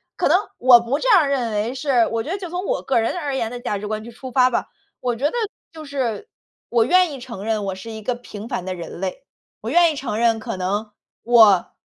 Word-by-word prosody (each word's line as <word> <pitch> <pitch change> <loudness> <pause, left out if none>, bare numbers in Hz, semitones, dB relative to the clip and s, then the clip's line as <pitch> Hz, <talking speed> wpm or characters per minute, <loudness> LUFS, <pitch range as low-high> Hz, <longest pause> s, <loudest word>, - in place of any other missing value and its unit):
可 - - +1
能 - - +6 0.2
我 245 -1 +7
不 240 +5 -2
这 - - -2
样 365 -10 +6
认 255 -5 -1
为 210 +3 -1
是， 260 -5 +2
我 225 -1 0
觉 - - -7
得 390 - -1
就 365 -3 -7
从 360 +3 -4
我 - - -1
个 265 - +1
人 225 - 0
而 290 -5 -3
言 230 -4 -2
的 245 - -6
价 210 -4 -2
值 210 +1 -6
观 215 0 -3
去 - - -9
出 255 +2 -9
发 255 -1 +4
吧。 245 - -1 0.3
我 245 -1 -1
觉 255 +5 -3
得 295 - +1 0.4
就 315 -1 -9
是 275 - -3 0.4
我 230 -1 +3
愿 360 +4 +4
意 275 - -7
承 235 -5 -8
认 215 -2 -1
我 195 - -2
是 190 +4 -9
一 220 -1 -7
个 250 - 0
平 230 -3 -9
凡 185 - -3
的 185 -1 -3
人 170 -1 -8
类， 190 -1 -4 0.4
我 220 - -5
愿 340 +1 +5
意 - - -5
承 260 -6 -3
认 230 -1 +3
可 220 - -5
能 205 +4 -2 0.3
我 220 -6 +5
240 Hz, 275 characters per minute, -21 LUFS, 215-275 Hz, 0.4 s, 我